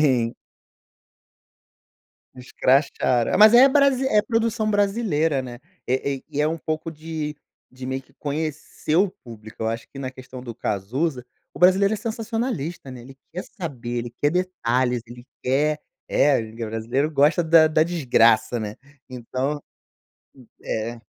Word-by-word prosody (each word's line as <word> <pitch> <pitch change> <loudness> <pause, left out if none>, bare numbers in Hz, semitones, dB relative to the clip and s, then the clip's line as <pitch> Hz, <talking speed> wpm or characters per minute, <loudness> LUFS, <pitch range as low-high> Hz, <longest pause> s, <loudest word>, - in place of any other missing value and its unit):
tem. 125 -6 +2 2.0
Escracharam. 125 -1 +1
Mas 215 +1 +9
é 255 +3 +8
brasi 270 -1 +3
é 210 -3 +3
produção 225 -1 0
brasileira, 195 - +1
né, 120 -1 -8 0.3
eh 130 +2 0
eh, - - -20
e 150 -1 -3
é 150 - +3
um 165 - -2
pouco 155 +1 -3
de 155 -1 -5 0.3
de 130 0 -9
meio 130 +1 -3
que - - -27
conhecer 155 +1 -3
o 190 +1 +4
público. 110 -2 -10
Eu 110 - 0
acho 115 0 -4
que 135 - -12
na 130 -1 -4
questão 130 -1 -11
do 120 -2 -7
Cazuza, 125 - -2 0.3
o - - -9
brasileiro 195 +3 +5
é - - -2
sensacionalista, 225 - -4
né, 125 - -9
ele 135 +2 -13 0.2
quer 180 +3 -5
saber, 130 - -5
ele 120 0 -6
quer 145 - +3
detalhes, 130 -9 0
ele 120 +1 -12 0.2
quer 150 +4 +1 0.3
é, 145 -2 +3
e 110 0 -8
brasileiro 115 +6 -2
gosta 150 +4 +3
da 160 -1 +6
da 155 0 +3
desgraça, 120 -8 +3
né. 105 -1 -5 0.3
Então 130 +4 -3 1.0
é. 115 +2 -3
145 Hz, 150 wpm, -23 LUFS, 125-175 Hz, 2.0 s, Mas